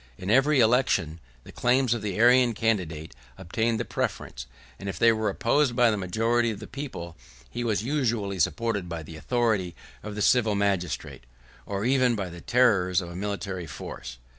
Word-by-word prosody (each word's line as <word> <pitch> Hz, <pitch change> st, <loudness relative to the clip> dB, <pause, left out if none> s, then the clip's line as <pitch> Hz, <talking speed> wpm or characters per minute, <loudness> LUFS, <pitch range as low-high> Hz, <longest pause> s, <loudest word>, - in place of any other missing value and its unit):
In 95 Hz, +2 st, -3 dB
every 135 Hz, +4 st, +4 dB
election, 110 Hz, -9 st, +2 dB, 0.2 s
the -, -, -12 dB
claims 125 Hz, 0 st, +2 dB
of 120 Hz, -, -3 dB
the 100 Hz, -2 st, -3 dB
Arian 120 Hz, 0 st, +5 dB
candidate 90 Hz, -9 st, -1 dB, 0.2 s
obtained 110 Hz, +5 st, -1 dB
the 120 Hz, -, -2 dB
preference; 60 Hz, 0 st, -4 dB, 0.3 s
and 100 Hz, -, -5 dB
if -, -, -5 dB
they 115 Hz, -, +5 dB
were 110 Hz, -1 st, 0 dB
opposed 120 Hz, +5 st, +1 dB
by 120 Hz, -2 st, +4 dB
the -, -, 0 dB
majority 115 Hz, +5 st, +1 dB
of 105 Hz, -3 st, -5 dB
the -, -, -8 dB
people, 125 Hz, -, -7 dB, 0.4 s
he 120 Hz, -, -3 dB
was 110 Hz, -3 st, 0 dB
usually 115 Hz, -8 st, -1 dB
supported 105 Hz, +1 st, 0 dB
by 85 Hz, -2 st, -5 dB
the 80 Hz, +1 st, -10 dB
authority 105 Hz, -2 st, 0 dB, 0.3 s
of 105 Hz, -, -7 dB
the 105 Hz, -, -1 dB
civil 115 Hz, -4 st, +3 dB
magistrate, 95 Hz, -10 st, -2 dB, 0.4 s
or 100 Hz, +1 st, -3 dB
even 130 Hz, -2 st, +3 dB
by 100 Hz, -4 st, -3 dB
the 85 Hz, 0 st, -10 dB
terrors 100 Hz, -8 st, +3 dB
of 85 Hz, -2 st, -7 dB
a -, -, -9 dB
military 95 Hz, -2 st, -4 dB
force. 65 Hz, -3 st, -8 dB
105 Hz, 180 wpm, -26 LUFS, 90-120 Hz, 0.4 s, Arian